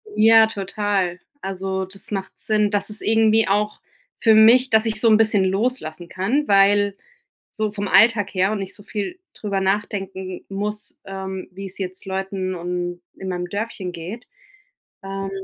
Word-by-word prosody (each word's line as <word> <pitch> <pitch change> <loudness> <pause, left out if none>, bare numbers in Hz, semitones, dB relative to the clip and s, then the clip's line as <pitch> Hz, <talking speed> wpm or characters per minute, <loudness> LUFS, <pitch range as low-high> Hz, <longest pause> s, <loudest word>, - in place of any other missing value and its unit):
Ja, 225 0 +7
total. 195 -3 -2 0.2
Also 190 0 -3
das 195 +3 -9
macht 195 -2 -3
Sinn. 210 -1 +1
Das 200 0 +1
ist 210 0 -1
irgendwie 220 0 +3
auch 210 +2 0 0.4
für 225 -2 +5
mich, 235 +4 +6
dass 220 +1 +4
ich 220 -1 0
so 230 - +4
'n 215 - +6
bisschen 210 -3 +3
loslassen 190 -5 -2
kann, 235 +11 0
weil 200 0 +4 0.5
so 215 -1 -2
vom 205 -1 -4
Alltag 220 -3 +4
her 190 +1 +2
und 215 - -2
nicht 195 -1 -5
so 205 - -13
viel 210 - -5
darüber 200 -2 -3
nachdenken 190 -1 -3
muss, 210 0 -5
ähm, 190 -1 -6
wie 195 +2 -8
es 190 - -10
jetzt 185 -1 -6
Leuten 190 -1 -3
und 175 0 -4
in 190 - -8
meinem 180 -1 -3
Dörfchen 200 -2 -4
geht. 180 +8 -8 0.8
Ähm, 195 0 -4
200 Hz, 165 wpm, -22 LUFS, 190-215 Hz, 0.8 s, Ja